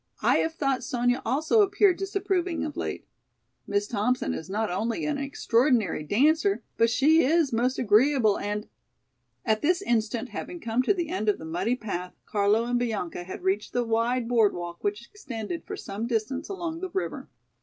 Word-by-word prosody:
I -, -, +4 dB
have 320 Hz, 0 st, 0 dB
thought 275 Hz, -4 st, 0 dB
Sonya 245 Hz, 0 st, 0 dB
also 315 Hz, -, +2 dB
appeared 405 Hz, -2 st, +4 dB
disapproving 385 Hz, -4 st, -1 dB
of 300 Hz, -, -5 dB
late. -, -, -4 dB, 0.6 s
Miss 205 Hz, 0 st, 0 dB
Thompson 240 Hz, +4 st, 0 dB
is 160 Hz, -, -6 dB
not 215 Hz, 0 st, -1 dB
only 230 Hz, -, -1 dB
an 300 Hz, -2 st, -1 dB
extraordinary 245 Hz, -, +1 dB
dancer, 310 Hz, -, +2 dB
but 230 Hz, -, +3 dB
she 305 Hz, +7 st, +4 dB
is 310 Hz, -1 st, +2 dB
most 250 Hz, +3 st, +1 dB
agreeable 235 Hz, -1 st, +3 dB
and——" 210 Hz, +1 st, -3 dB, 0.8 s
At 220 Hz, -2 st, +1 dB
this 350 Hz, +3 st, +2 dB
instant, 230 Hz, +1 st, 0 dB
having 345 Hz, +10 st, -6 dB
come 235 Hz, -4 st, 0 dB
to 270 Hz, -, +2 dB
the 345 Hz, -4 st, -2 dB
end 215 Hz, -12 st, -1 dB
of 205 Hz, -, +2 dB
the 160 Hz, -, -9 dB
muddy 180 Hz, +9 st, -1 dB
path, 180 Hz, -6 st, -5 dB
Carlo 210 Hz, +2 st, +2 dB
and 245 Hz, 0 st, 0 dB
Bianca 200 Hz, -7 st, -3 dB
had 185 Hz, -, -8 dB
reached 195 Hz, +2 st, -1 dB
the 245 Hz, -, +1 dB
wide 230 Hz, +1 st, 0 dB
board 230 Hz, -4 st, +3 dB
walk 175 Hz, 0 st, -7 dB
which 210 Hz, +3 st, -2 dB
extended 275 Hz, -, -6 dB
for 410 Hz, -, -6 dB
some 210 Hz, -, -5 dB
distance 235 Hz, +3 st, -2 dB
along 340 Hz, -4 st, -4 dB
the 375 Hz, -, -3 dB
river. 380 Hz, +2 st, -4 dB
240 Hz, 175 wpm, -27 LUFS, 210-310 Hz, 0.8 s, I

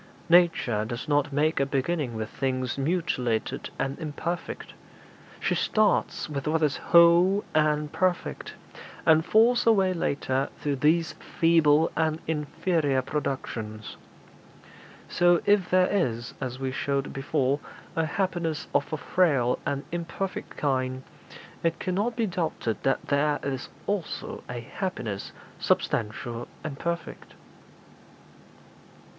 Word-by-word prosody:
Nature 165 Hz, -11 st, +4 dB
does 120 Hz, +2 st, -5 dB
not 145 Hz, -1 st, +2 dB
make 150 Hz, +2 st, +1 dB
a 140 Hz, -, +3 dB
beginning 140 Hz, -2 st, -1 dB
with 110 Hz, -1 st, -3 dB
things 130 Hz, 0 st, -2 dB
mutilated 140 Hz, -7 st, -1 dB
and 135 Hz, +1 st, -2 dB
imperfect; 160 Hz, +2 st, -4 dB, 0.7 s
she -, -, 0 dB
starts 215 Hz, -1 st, +1 dB
with 145 Hz, -1 st, -4 dB
what 160 Hz, +1 st, +1 dB
is 145 Hz, -2 st, +2 dB
whole 175 Hz, +4 st, +5 dB
and 150 Hz, -1 st, +1 dB
perfect, 185 Hz, -2 st, -1 dB, 0.5 s
and 160 Hz, 0 st, +5 dB
falls 230 Hz, +6 st, +4 dB
away 195 Hz, -4 st, +4 dB
later 140 Hz, -5 st, -1 dB
to 145 Hz, -1 st, 0 dB
these 160 Hz, +5 st, +2 dB
feeble 165 Hz, -1 st, +3 dB
and 160 Hz, 0 st, +1 dB
inferior 150 Hz, -2 st, 0 dB
productions. 120 Hz, -7 st, -4 dB, 1.1 s
So 175 Hz, -1 st, +4 dB
if 205 Hz, -3 st, +3 dB
there 185 Hz, 0 st, +5 dB
is, 120 Hz, -, -1 dB
as 130 Hz, -1 st, -3 dB
we 135 Hz, -1 st, -2 dB
showed 140 Hz, +1 st, -2 dB
before, 135 Hz, 0 st, 0 dB, 0.4 s
a 165 Hz, -1 st, +1 dB
happiness 170 Hz, -3 st, -1 dB
of -, -, +1 dB
a 155 Hz, -, -1 dB
frail 145 Hz, -7 st, +2 dB
and 140 Hz, 0 st, -1 dB
imperfect 175 Hz, +3 st, -4 dB
kind, 130 Hz, -2 st, -1 dB, 0.6 s
it 165 Hz, 0 st, 0 dB
cannot 205 Hz, +6 st, -1 dB
be 230 Hz, -1 st, +1 dB
doubted 165 Hz, -, -2 dB
but 135 Hz, -, +1 dB
there 145 Hz, +1 st, +1 dB
is 135 Hz, -2 st, -3 dB, 0.2 s
also 200 Hz, -5 st, -3 dB
a 120 Hz, -1 st, -4 dB
happiness 115 Hz, -, -4 dB, 0.3 s
substantial 115 Hz, +2 st, -1 dB, 0.2 s
and 140 Hz, -3 st, -5 dB
perfect.' 170 Hz, 0 st, -5 dB
150 Hz, 120 wpm, -27 LUFS, 135-170 Hz, 1.1 s, whole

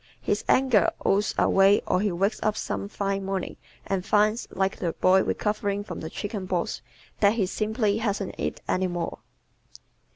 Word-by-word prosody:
His -, -, -1 dB
anger 255 Hz, -6 st, +4 dB, 0.2 s
oozes 205 Hz, +2 st, +2 dB
away 195 Hz, +1 st, +4 dB
or 180 Hz, -, +1 dB
he 205 Hz, -1 st, +1 dB
wakes 195 Hz, +5 st, 0 dB
up 215 Hz, 0 st, 0 dB
some -, -, -3 dB
fine 195 Hz, -1 st, -2 dB
morning 195 Hz, -1 st, -3 dB, 0.3 s
and 190 Hz, -2 st, -1 dB
finds, 210 Hz, +3 st, +2 dB
like 190 Hz, +1 st, -1 dB
the 170 Hz, -2 st, -2 dB
boy 190 Hz, +1 st, +4 dB
recovering 205 Hz, -1 st, -1 dB
from -, -, -7 dB
the 160 Hz, -, -6 dB
chickenpox, 185 Hz, -, -3 dB, 0.4 s
that 205 Hz, 0 st, +5 dB
he 220 Hz, -4 st, +1 dB
"simply 215 Hz, +2 st, 0 dB
hasn't 205 Hz, -3 st, -2 dB
it -, -, -3 dB
any 185 Hz, 0 st, +1 dB
more." 175 Hz, -1 st, -4 dB
200 Hz, 160 wpm, -26 LUFS, 190-210 Hz, 0.4 s, that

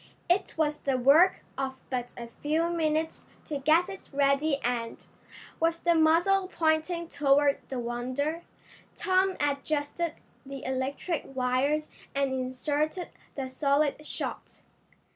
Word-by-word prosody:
It 365 Hz, +2 st, +1 dB
was 300 Hz, -1 st, +1 dB
the 270 Hz, -2 st, 0 dB
work 285 Hz, +9 st, +5 dB, 0.2 s
of 265 Hz, -1 st, -2 dB, 0.2 s
but 245 Hz, -1 st, -3 dB
a 235 Hz, -1 st, -7 dB
few 320 Hz, +3 st, +1 dB
minutes 320 Hz, -1 st, -1 dB, 0.2 s
to 290 Hz, -2 st, -3 dB
get 315 Hz, +6 st, +4 dB
it 390 Hz, 0 st, -9 dB
ready 280 Hz, +1 st, +2 dB
and, 235 Hz, -1 st, -2 dB, 0.5 s
with 330 Hz, 0 st, +1 dB
the 345 Hz, -, +4 dB
muzzle 340 Hz, +4 st, +4 dB
pointing 335 Hz, 0 st, 0 dB
toward 285 Hz, -2 st, +3 dB
the 265 Hz, -, -3 dB
Wonder, 255 Hz, +7 st, -2 dB, 0.5 s
Tom 375 Hz, 0 st, +2 dB
adjusted 290 Hz, +3 st, -1 dB, 0.3 s
the 275 Hz, -1 st, -8 dB
electric 265 Hz, +6 st, -2 dB
wires 265 Hz, +4 st, +1 dB, 0.3 s
and 275 Hz, -1 st, +1 dB
inserted 290 Hz, +7 st, -1 dB, 0.3 s
the 270 Hz, -2 st, -3 dB
solid 280 Hz, +3 st, +1 dB
shot. -, -, -6 dB
295 Hz, 125 wpm, -28 LUFS, 270-330 Hz, 0.5 s, work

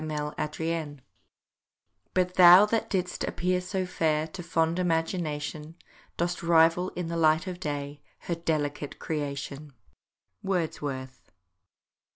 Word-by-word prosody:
MY 150 Hz, -1 st, -3 dB
FIRSTBORN 155 Hz, -2 st, -3 dB, 1.1 s
"But 180 Hz, -1 st, +1 dB
thou 180 Hz, +2 st, +9 dB
that 225 Hz, +1 st, -1 dB
didst 185 Hz, -2 st, -2 dB
appear 180 Hz, +1 st, -1 dB
so 185 Hz, +1 st, -2 dB
fair 155 Hz, -3 st, 0 dB
To 180 Hz, +3 st, -7 dB
fond 165 Hz, 0 st, 0 dB
imagination, 160 Hz, -3 st, -2 dB, 0.4 s
Dost 175 Hz, +1 st, -1 dB
rival 170 Hz, +2 st, +4 dB
in 180 Hz, -, -3 dB
the 170 Hz, -, -3 dB
light 160 Hz, +1 st, +3 dB
of 180 Hz, -2 st, -6 dB
day, 145 Hz, -3 st, -4 dB, 0.2 s
Her 175 Hz, -, -3 dB
delicate 150 Hz, -3 st, -2 dB
creation!" 145 Hz, -1 st, -5 dB, 0.7 s
WORDSWORTH. 145 Hz, -8 st, -3 dB
165 Hz, 115 wpm, -28 LUFS, 150-180 Hz, 1.1 s, thou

